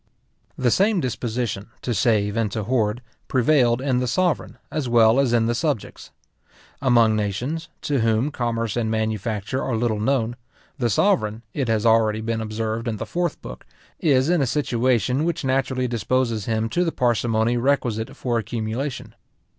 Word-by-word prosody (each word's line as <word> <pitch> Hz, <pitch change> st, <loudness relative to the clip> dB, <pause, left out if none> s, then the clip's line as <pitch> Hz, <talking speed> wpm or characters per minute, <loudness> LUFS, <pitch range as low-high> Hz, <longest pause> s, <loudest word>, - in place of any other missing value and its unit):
The 125 Hz, -2 st, +2 dB
same 200 Hz, -, +3 dB
disposition, 120 Hz, -, -3 dB, 0.2 s
to 120 Hz, -, -1 dB
save 105 Hz, -3 st, +1 dB
and 115 Hz, -3 st, 0 dB
to 110 Hz, -, -2 dB
hoard, 115 Hz, 0 st, 0 dB, 0.2 s
prevailed 125 Hz, -2 st, +3 dB
in 130 Hz, -3 st, +1 dB
the 125 Hz, -, -1 dB
sovereign, 180 Hz, +4 st, 0 dB
as 150 Hz, -5 st, -2 dB
well 115 Hz, +1 st, +5 dB
as 135 Hz, -3 st, +2 dB
in 115 Hz, -1 st, +3 dB
the 120 Hz, -, +1 dB
subjects. 140 Hz, -3 st, -3 dB, 0.7 s
Among 120 Hz, -5 st, +4 dB
nations, 120 Hz, -, -2 dB
to 140 Hz, -2 st, 0 dB
whom 115 Hz, +5 st, +1 dB
commerce 115 Hz, -4 st, -2 dB
and 115 Hz, -2 st, 0 dB
manufacture 110 Hz, +2 st, -2 dB
are 125 Hz, -, -1 dB
little 110 Hz, -2 st, 0 dB
known, 120 Hz, 0 st, 0 dB, 0.4 s
the 120 Hz, -2 st, +1 dB
sovereign, 115 Hz, -, +1 dB
it 135 Hz, -4 st, -1 dB
has 110 Hz, -1 st, +1 dB
already 110 Hz, -1 st, +3 dB
been 110 Hz, 0 st, -2 dB
observed 110 Hz, +1 st, -3 dB
in 110 Hz, -2 st, -2 dB
the -, -, -4 dB
Fourth 175 Hz, -2 st, -2 dB
book, -, -, -9 dB, 0.4 s
is 135 Hz, -3 st, +3 dB
in 175 Hz, -2 st, +2 dB
a 135 Hz, -, +1 dB
situation 125 Hz, -1 st, +1 dB
which 170 Hz, -4 st, -1 dB
naturally 130 Hz, -1 st, 0 dB
disposes 115 Hz, -2 st, -1 dB
him 110 Hz, -1 st, 0 dB
to 175 Hz, +9 st, +1 dB
the 165 Hz, -, 0 dB
parsimony 120 Hz, -2 st, +1 dB
requisite 120 Hz, -4 st, 0 dB
for 120 Hz, -2 st, 0 dB
accumulation. 115 Hz, +4 st, -4 dB
120 Hz, 160 wpm, -23 LUFS, 110-130 Hz, 0.7 s, well